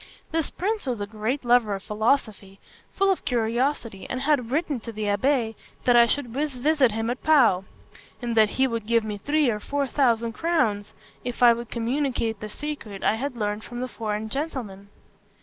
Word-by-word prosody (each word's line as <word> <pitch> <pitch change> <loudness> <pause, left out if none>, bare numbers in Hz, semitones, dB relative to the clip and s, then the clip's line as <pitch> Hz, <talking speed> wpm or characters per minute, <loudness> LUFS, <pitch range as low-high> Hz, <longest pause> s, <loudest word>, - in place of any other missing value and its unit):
This 325 -1 0
prince 415 -2 -2
was 245 -4 -1
a 205 - -2
great 220 +6 -3
lover 240 -4 +4
of 195 - -8
philosophy, 210 -3 -1 0.3
full 390 0 +2
of 380 - -2
curiosity, 235 -2 -1
and 255 - -3
had 275 -5 +1
written 290 -1 0
to 230 +1 -7
the 215 -1 -5
abbé 225 +3 +1 0.3
that 245 - +4
I 235 0 +7
should 275 +1 -1
visit 280 +1 +1
him 225 +2 -1
at 250 - -5
Pau; 240 -12 +4 0.5
and 240 -2 -3
that 215 -2 +5
he 265 - +4
would 230 -4 -3
give 230 -1 +3
me 210 -1 -5
three 295 +5 +2
or 210 - -3
four 280 +5 -1
thousand 235 -4 +1
crowns 230 -11 0 0.3
if 245 0 -2
I 240 -1 +9
would 235 0 -6
communicate 235 -2 -1
the 215 - -6
secret 235 -7 -6
I - - +3
had 255 +4 -3
learned 210 0 -2
from 240 0 -7
the 255 - -2
foreign 220 -2 -3
gentleman. 220 -8 -5
235 Hz, 185 wpm, -25 LUFS, 215-280 Hz, 0.5 s, I